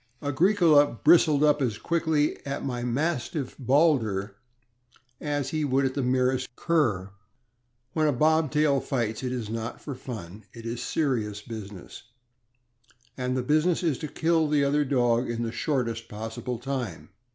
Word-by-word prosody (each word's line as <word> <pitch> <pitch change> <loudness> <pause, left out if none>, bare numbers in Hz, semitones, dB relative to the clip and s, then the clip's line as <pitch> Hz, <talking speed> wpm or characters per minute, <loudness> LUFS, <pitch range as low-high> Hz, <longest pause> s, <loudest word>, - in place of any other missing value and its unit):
Agricola 155 0 +4 0.2
bristled 155 -2 +5
up 150 -1 +4
as 115 -5 0
quickly 160 -3 0
at 140 0 -4
my 125 -3 -3
Mastiff 140 +2 -2
Baldur 125 -8 +2 0.8
as 145 -3 -2
he 155 +1 -1
would 135 -1 +2
at 130 - 0
the 140 - -1
merest 130 0 +1
cur; 150 - +1
and 95 - -11 0.8
when 155 -1 +2
a - - +3
Bobtail 150 0 +2
fights, 115 -5 -2
it 130 -1 -3
is 120 -4 -3
not 115 +1 -5
for 145 - -6
fun; 110 -6 -8
it 115 -1 -10
is 115 +1 -4
serious 110 -10 -1
business, 105 -5 -9 1.1
and 130 0 -2
the 125 - -1
busi 150 +5 +2
ness 180 0 +1
is 155 -6 0
to 155 - -4
kill 160 +2 +1
the 145 -1 +2
other 145 +1 +2
dog 120 -3 +1
in 120 0 -2
the 115 - -2
shortest 115 -3 -2
possible 110 +3 -5
time. 125 -8 -5
130 Hz, 155 wpm, -26 LUFS, 115-150 Hz, 1.1 s, bristled